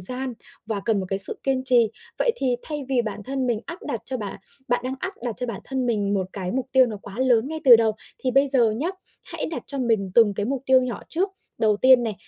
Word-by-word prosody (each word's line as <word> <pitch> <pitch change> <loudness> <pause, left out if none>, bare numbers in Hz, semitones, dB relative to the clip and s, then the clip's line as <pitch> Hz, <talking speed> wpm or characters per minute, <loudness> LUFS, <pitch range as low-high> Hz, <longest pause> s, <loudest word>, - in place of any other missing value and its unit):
gian 255 +7 -3 0.3
và 215 -3 -2
cần 220 -4 +1
một 190 - -4
cái 195 - -1
sự 195 - +6
kiên 265 -1 0
trì. 240 -4 +4 0.3
Vậy 480 - +2
thì 255 - 0
thay 295 -2 -5
vì 255 -3 +2
bản 210 -2 -5
thân 265 +3 -2
mình 230 -3 0
áp 335 +2 -7
đặt 230 -3 -3
cho 260 +2 -3
bạn 210 -5 -6 0.3
bạn 245 0 +1
đang 260 +1 -2
áp 380 +1 -4
đặt 235 - -2
cho 250 - -3
bản 225 -5 -5
thân 265 -2 -2
mình 205 -4 0
một 190 -2 -1
cái 185 -3 -4
mục 255 0 -2
tiêu 260 -1 +6
nó 215 -3 -5
quá 200 - -10
lớn 255 -1 +3
ngay 315 0 -5
từ 245 -4 +10
đầu, 225 -1 +2 0.3
thì 255 - -1
bây 275 +2 +3
giờ 245 -5 +4
nhá, 250 +10 -2 0.3
hãy - - -5
đặt 330 - -5
cho 280 - -2
mình 220 -6 0
từng 220 -4 +5
cái 205 +1 -2
mục 270 +1 -2
tiêu 260 0 +6
nhỏ 250 -2 -4
trước. 370 +5 0 0.3
Đầu 215 -2 +3
tiên 255 +1 +6
này, 225 -3 -2
245 Hz, 265 wpm, -24 LUFS, 215-265 Hz, 0.3 s, từ